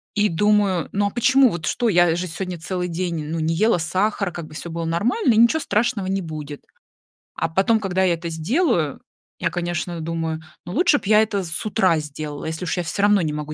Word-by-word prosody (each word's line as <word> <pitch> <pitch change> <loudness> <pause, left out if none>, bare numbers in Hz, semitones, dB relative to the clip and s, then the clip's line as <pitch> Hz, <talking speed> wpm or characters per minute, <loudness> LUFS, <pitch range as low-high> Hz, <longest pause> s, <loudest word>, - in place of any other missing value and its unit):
И 210 0 +3
думаю: 200 -1 +2
"Ну, 205 0 +1
а - - -1
почему, 260 +3 +4
вот 170 -4 -5
что, 240 +7 0
я 175 -4 +4
же 180 +1 -3
сегодня 180 +1 -5
целый 180 +2 -3
день, 170 -2 -3
ну, 165 +2 -3
не 160 +1 0
ела 215 -1 +3
сахар, 190 +3 0
как 170 -2 -7
бы 155 - -14
всё 165 +2 -6
было 165 0 -4
нормально 235 - +1
и 215 - +1
ничего 235 +7 +5
страшного 210 -2 0
не 195 +1 -1
будет". 155 -3 -7 0.7
А 165 - -1
потом, 195 +6 +2
когда 190 -2 0
я 180 -2 +3
это 170 0 -6
сделаю, 170 - 0 0.4
я, - - 0
конечно, 175 -1 -3
думаю: 160 -1 -3 0.2
"Ну, 175 - -6
лучше 340 -1 +4
б - - -25
я 215 0 +6
это 205 -3 -1
с 165 +4 -4
утра 185 -6 +2
сделала, 150 0 -6
если 160 +3 -4
уж - - -1
я 175 - 0
всё 170 +4 -2
равно 205 -1 +4
не 155 -3 -1
могу 150 0 -5
175 Hz, 220 wpm, -22 LUFS, 165-210 Hz, 0.7 s, я